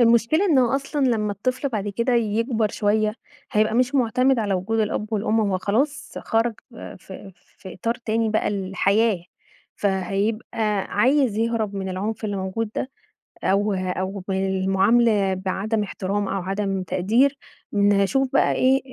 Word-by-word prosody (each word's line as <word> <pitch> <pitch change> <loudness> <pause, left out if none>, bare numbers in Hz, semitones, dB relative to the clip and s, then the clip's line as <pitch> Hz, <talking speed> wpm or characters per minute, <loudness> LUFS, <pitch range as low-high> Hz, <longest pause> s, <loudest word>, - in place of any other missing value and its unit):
المشكلة 235 - +4
إن 320 -8 +3
هو 250 0 +3
أصلًا 275 0 -1
لمّا 215 -4 0
الطفل 255 +6 -2
بعد 210 -4 -3
كده 235 +5 0
يكبر 225 0 +1
شويّة، 215 0 +1 0.4
هيبقى 215 +1 +2
مش 250 +3 +2
معتمد 255 +1 +2
على 205 -3 0
وجود 220 +5 -1
الأب 215 +1 -2
والأم 220 +1 +1
هو 200 -3 0
خلاص، 270 +10 -1
خرج 225 0 0 0.4
في 190 +1 -11
في 185 +1 -13
إطار 230 +5 -1
تاني 225 -1 -1
بقى 220 - +1
الحياة، 195 0 +1 0.5
فهيبقى 205 +2 -1 0.2
عايز 260 -2 +3
يهرب 225 -3 -1
من 190 -1 -3
العُنف 210 +4 -3
اللي 205 -1 -2
موجود 195 +3 -3
ده، 260 - -2 0.5
أو 200 +1 +2
أو 185 +1 -3
بالمعاملة 195 +2 +2
بعدم 195 +4 -2
احترام 200 0 -3
أو 190 0 -2
عدم 195 0 -2
تقدير، 235 +11 +2 0.4
نشوف 205 +6 +2
بقى - - +3
إيه 265 +1 +3
215 Hz, 145 wpm, -23 LUFS, 195-235 Hz, 0.5 s, المشكلة